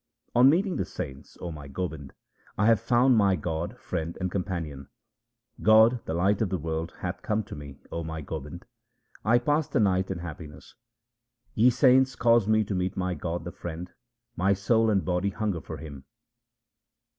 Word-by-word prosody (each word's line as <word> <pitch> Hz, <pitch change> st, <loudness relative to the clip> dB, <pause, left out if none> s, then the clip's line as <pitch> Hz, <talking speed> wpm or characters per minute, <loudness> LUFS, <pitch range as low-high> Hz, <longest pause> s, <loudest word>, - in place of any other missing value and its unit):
On 125 Hz, +2 st, +7 dB
meeting 185 Hz, +5 st, +1 dB
the -, -, 0 dB
saints, 65 Hz, 0 st, -8 dB
O 85 Hz, -, -4 dB
my 75 Hz, -3 st, -9 dB
Gobind, 75 Hz, -2 st, -5 dB, 0.4 s
I 105 Hz, -, +2 dB
have 115 Hz, -2 st, +5 dB
found 125 Hz, +3 st, +3 dB
my 100 Hz, -3 st, +4 dB
God, 85 Hz, +7 st, -4 dB
Friend, 85 Hz, -5 st, -4 dB
and 95 Hz, -1 st, -2 dB
Companion. 85 Hz, -8 st, -4 dB, 0.7 s
God, 110 Hz, +2 st, +5 dB
the 80 Hz, -, -3 dB
life 95 Hz, +4 st, +2 dB
of 110 Hz, -, +1 dB
the 95 Hz, -, -1 dB
world, 80 Hz, +1 st, -3 dB
hath 90 Hz, -1 st, -4 dB
come 110 Hz, 0 st, -1 dB
to 105 Hz, -, -9 dB
me, 70 Hz, -2 st, -9 dB
O 85 Hz, -, -3 dB
my 80 Hz, 0 st, -5 dB
Gobind; 80 Hz, +3 st, -7 dB, 0.6 s
I 115 Hz, +3 st, +4 dB
pass 145 Hz, +5 st, +1 dB
the -, -, 0 dB
night 95 Hz, -3 st, +2 dB
in 95 Hz, -, -3 dB
happiness. 80 Hz, -3 st, -9 dB, 0.8 s
Ye 115 Hz, +3 st, +5 dB
saints, 130 Hz, 0 st, +4 dB
cause 115 Hz, -3 st, +3 dB
me 110 Hz, 0 st, +3 dB
to 100 Hz, -, -4 dB
meet 90 Hz, 0 st, -2 dB
my 90 Hz, -1 st, -1 dB
God, 85 Hz, -1 st, -4 dB
the 85 Hz, -, -6 dB
Friend; 85 Hz, +1 st, -7 dB, 0.4 s
my 95 Hz, +3 st, +2 dB
soul 110 Hz, +3 st, +2 dB
and 100 Hz, -3 st, +1 dB
body 90 Hz, +2 st, 0 dB
hunger 100 Hz, -4 st, -2 dB
for -, -, -7 dB
Him. 70 Hz, -4 st, -10 dB
95 Hz, 180 wpm, -27 LUFS, 80-110 Hz, 0.8 s, On